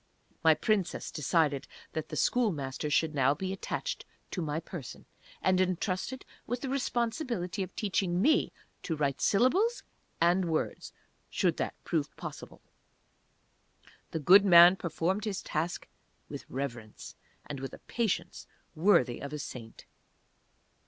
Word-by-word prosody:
My 160 Hz, -1 st, +6 dB
Princess 200 Hz, -3 st, -1 dB
decided 150 Hz, -2 st, +1 dB, 0.3 s
that 160 Hz, -1 st, -4 dB
the -, -, -5 dB
Schoolmaster 150 Hz, -, 0 dB
should 155 Hz, +1 st, +2 dB
now 135 Hz, 0 st, +3 dB
be 190 Hz, +4 st, -3 dB
attached -, -, -4 dB, 0.3 s
to 180 Hz, -, -3 dB
my 155 Hz, -1 st, -2 dB
person, 165 Hz, -6 st, -9 dB, 0.4 s
and 185 Hz, 0 st, +3 dB
entrusted 185 Hz, +7 st, -2 dB, 0.2 s
with 245 Hz, +1 st, -2 dB
the 270 Hz, -, -3 dB
responsibility 235 Hz, -, -1 dB
of 185 Hz, -, -5 dB
teaching 190 Hz, -4 st, 0 dB
me 305 Hz, +10 st, +3 dB, 0.3 s
to 165 Hz, -, -2 dB
write 140 Hz, -3 st, -1 dB
syllables, 365 Hz, -, +3 dB, 0.4 s
and 175 Hz, +2 st, +3 dB
words 160 Hz, -2 st, -2 dB, 0.4 s
(should -, -, +1 dB
that -, -, -2 dB
prove -, -, -2 dB
possible). -, -, -9 dB, 1.5 s
The -, -, -3 dB
good 185 Hz, +7 st, +7 dB
man 175 Hz, -1 st, +9 dB
performed 185 Hz, +4 st, -2 dB
his 205 Hz, -3 st, -3 dB
task 165 Hz, +3 st, -3 dB, 0.4 s
with -, -, -8 dB
reverence, 120 Hz, -5 st, -6 dB, 0.3 s
and 145 Hz, -2 st, -6 dB
with 135 Hz, 0 st, -5 dB
a -, -, -10 dB
patience 190 Hz, -7 st, -3 dB, 0.3 s
worthy 165 Hz, -, +3 dB
of 140 Hz, -, -6 dB
a -, -, -2 dB
saint. 120 Hz, -5 st, -8 dB
175 Hz, 130 wpm, -30 LUFS, 150-205 Hz, 1.5 s, man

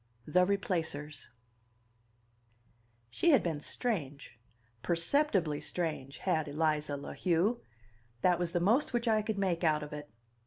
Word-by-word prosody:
XIV: 150 Hz, -, -11 dB
The 180 Hz, 0 st, +6 dB
Replacers 160 Hz, -7 st, -2 dB, 1.8 s
She 340 Hz, -, +2 dB
had 285 Hz, -, +5 dB
been 160 Hz, -4 st, -2 dB
strange, 145 Hz, -, -3 dB, 0.4 s
perceptibly 170 Hz, -, +1 dB
strange, 155 Hz, -6 st, -3 dB
had 160 Hz, -5 st, 0 dB
Eliza 150 Hz, -1 st, 0 dB
La 140 Hz, -, -7 dB
Heu; 185 Hz, +7 st, +1 dB, 0.6 s
that 180 Hz, +2 st, +3 dB
was 175 Hz, -1 st, -1 dB
the 175 Hz, -, +1 dB
most 230 Hz, -, +2 dB
which 240 Hz, 0 st, 0 dB
I 215 Hz, -1 st, +3 dB
could 215 Hz, 0 st, -3 dB
make 185 Hz, -3 st, 0 dB
out 155 Hz, -2 st, +2 dB
of 150 Hz, -, -8 dB
it. 150 Hz, 0 st, -7 dB
170 Hz, 140 wpm, -32 LUFS, 150-200 Hz, 1.8 s, The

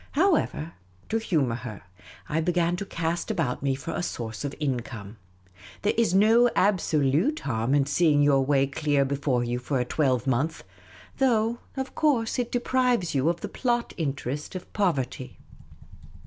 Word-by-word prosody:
However, 280 Hz, -, +1 dB, 0.4 s
to 225 Hz, -, +1 dB
humour 145 Hz, -, 0 dB
her, 115 Hz, -5 st, -8 dB, 0.4 s
I 155 Hz, +2 st, 0 dB
began 175 Hz, 0 st, +1 dB
to 200 Hz, -, -5 dB
cast 165 Hz, +1 st, -2 dB
about 140 Hz, -7 st, -1 dB
me 135 Hz, -1 st, +1 dB
for 160 Hz, +5 st, -6 dB
a -, -, -2 dB
source 115 Hz, -9 st, -5 dB
of 145 Hz, -1 st, -4 dB
in 135 Hz, -5 st, 0 dB
come. 115 Hz, -3 st, -9 dB, 0.7 s
There 205 Hz, -, +2 dB
is 230 Hz, -5 st, +2 dB
no 225 Hz, +4 st, +5 dB
absolute 175 Hz, -, +2 dB
harm 120 Hz, +1 st, 0 dB
in 140 Hz, -1 st, +3 dB
seeing 145 Hz, 0 st, +3 dB
your 140 Hz, -2 st, +4 dB
way 135 Hz, 0 st, +3 dB
clear 140 Hz, 0 st, +1 dB
before 135 Hz, -3 st, 0 dB
you 120 Hz, +1 st, -2 dB
for 130 Hz, +2 st, -1 dB
a 125 Hz, -, 0 dB
twelvemonth, 130 Hz, +2 st, 0 dB, 0.6 s
though 235 Hz, -3 st, +2 dB, 0.2 s
of 265 Hz, 0 st, -4 dB
course 255 Hz, -7 st, +1 dB
it 240 Hz, -1 st, -2 dB
deprives 245 Hz, -6 st, +1 dB
you 140 Hz, +3 st, +2 dB
of 170 Hz, 0 st, -2 dB
the -, -, -3 dB
plot 240 Hz, -2 st, -1 dB
interest 145 Hz, -1 st, -3 dB
of 185 Hz, -, -8 dB
poverty. 135 Hz, -, -1 dB
150 Hz, 160 wpm, -26 LUFS, 135-210 Hz, 0.7 s, no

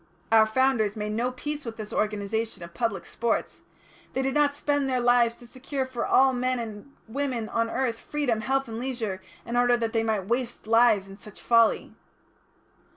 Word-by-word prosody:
Our 220 Hz, -1 st, +6 dB
Founders 225 Hz, -3 st, +2 dB
made 210 Hz, 0 st, -3 dB
no 235 Hz, +4 st, 0 dB
peace 295 Hz, +3 st, -5 dB
with 230 Hz, -2 st, -7 dB
this 215 Hz, -1 st, -6 dB
organisation 215 Hz, -1 st, -2 dB
of 170 Hz, 0 st, -10 dB
public 225 Hz, +2 st, -2 dB
sports. 235 Hz, -1 st, -2 dB, 0.5 s
They 265 Hz, -, 0 dB
did 265 Hz, 0 st, 0 dB
not 290 Hz, -1 st, +3 dB
spend 285 Hz, -2 st, 0 dB
their 255 Hz, -1 st, +1 dB
lives 240 Hz, -1 st, +4 dB
to 240 Hz, -, -15 dB
secure 265 Hz, +2 st, -4 dB
for 260 Hz, -2 st, -3 dB
all 265 Hz, 0 st, +5 dB
men 255 Hz, 0 st, 0 dB
and 225 Hz, +2 st, -7 dB, 0.2 s
women 250 Hz, -2 st, -2 dB
on 230 Hz, 0 st, 0 dB
the -, -, -7 dB
earth 240 Hz, -3 st, -1 dB
freedom, 260 Hz, -7 st, -1 dB
health, 270 Hz, +3 st, 0 dB
and 225 Hz, 0 st, -5 dB
leisure, 235 Hz, -7 st, -3 dB, 0.2 s
in 235 Hz, -, -4 dB
order 245 Hz, 0 st, +4 dB
that 230 Hz, -1 st, -2 dB
they 225 Hz, -, +2 dB
might 220 Hz, -4 st, -1 dB
waste 240 Hz, +2 st, -2 dB
lives 225 Hz, -3 st, +4 dB
in 195 Hz, +1 st, -12 dB
such 210 Hz, 0 st, -12 dB
folly." 230 Hz, -2 st, +3 dB
235 Hz, 190 wpm, -26 LUFS, 220-260 Hz, 0.5 s, Our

